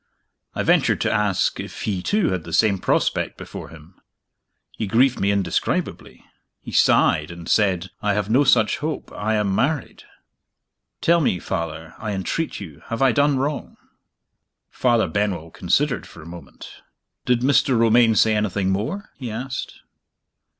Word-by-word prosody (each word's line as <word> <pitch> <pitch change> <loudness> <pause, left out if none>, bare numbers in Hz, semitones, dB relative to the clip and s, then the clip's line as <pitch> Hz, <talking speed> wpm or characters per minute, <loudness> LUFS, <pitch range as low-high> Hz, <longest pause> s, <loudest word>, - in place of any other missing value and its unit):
I - - -1
ventured - - +3
to - - +1
ask 105 -3 +1
if - - -7
he 95 -4 -2
too 205 - +1
had 90 -3 -2
the 80 - -9
same 100 +1 +3
prospect - - 0
before - - -9
him. 80 +3 -16 0.7
He 110 - -4
grieved 125 +5 +3
me 100 - +1
indescribably. 95 -4 -2 0.3
He - - -10
sighed 75 0 +3
and 85 -1 -9
said, 95 -3 +1
'I 105 -1 +1
have 105 -2 -1
no 125 +7 +3
such 120 -5 +3
hope; 155 +1 -4
I 110 +1 -1
am 105 -2 0
married.' 140 +7 -1 1.0
Tell 170 0 +3
me 95 - +1
Father, 80 -1 -5
I 110 -1 -4
entreat 100 - -3
you, 80 -8 -10
have 115 +3 -1
I 130 - +5
done 145 +2 +2
wrong?" 145 +3 -3 0.9
Father 120 -3 +2
Benwell 95 -6 -2
considered 125 - 0
for 80 - -13
a - - -14
moment. 85 +1 -12 0.4
"Did 125 -1 +2
Mr. 130 -1 +3
Romayne 115 0 +4
say 110 +1 +4
anything 100 -2 0
more?" 145 - -3
he 125 -4 -5
asked. 125 +4 -6
105 Hz, 155 wpm, -22 LUFS, 95-125 Hz, 1.0 s, I